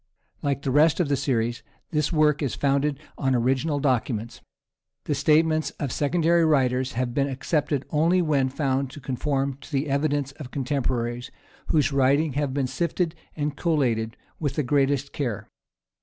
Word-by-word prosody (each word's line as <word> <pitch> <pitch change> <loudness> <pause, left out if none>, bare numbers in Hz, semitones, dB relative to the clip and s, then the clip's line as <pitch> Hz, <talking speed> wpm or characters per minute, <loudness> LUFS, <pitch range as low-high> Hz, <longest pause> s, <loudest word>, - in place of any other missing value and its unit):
Like 140 -1 -1
the 135 - 0
rest 150 +5 +4
of 170 -5 +1
the 140 - +3
series, 120 -4 -1 0.3
this 150 -1 0
work 155 -2 +3
is 140 -5 -1
founded 140 0 +1 0.2
on 135 -2 +2
original 135 +5 +1
documents. 120 -4 -1 0.6
The - - -1
statements 155 -1 +3
of 140 -4 -2
secondary 165 +4 +2
writers 130 -4 +2
have 120 0 -2
been 140 +1 +1
accepted 140 +1 -1
only 165 +4 +3
when 145 -6 +2
found 135 -1 -1
to - - -9
conform 135 +1 -2
to - - -13
the 140 +2 0
evidence 140 -1 0
of 140 -5 -7
contemporaries, 125 -3 -2 0.4
whose 150 -2 +2
writings 140 +3 +3
have 145 0 -1
been 135 0 0
sifted 170 +4 -1 0.2
and 150 -1 -2
collated 125 -10 0 0.2
with 145 -4 -2
the 150 - 0
greatest 140 +1 +1
care. 120 -9 -3
140 Hz, 155 wpm, -25 LUFS, 130-150 Hz, 0.6 s, rest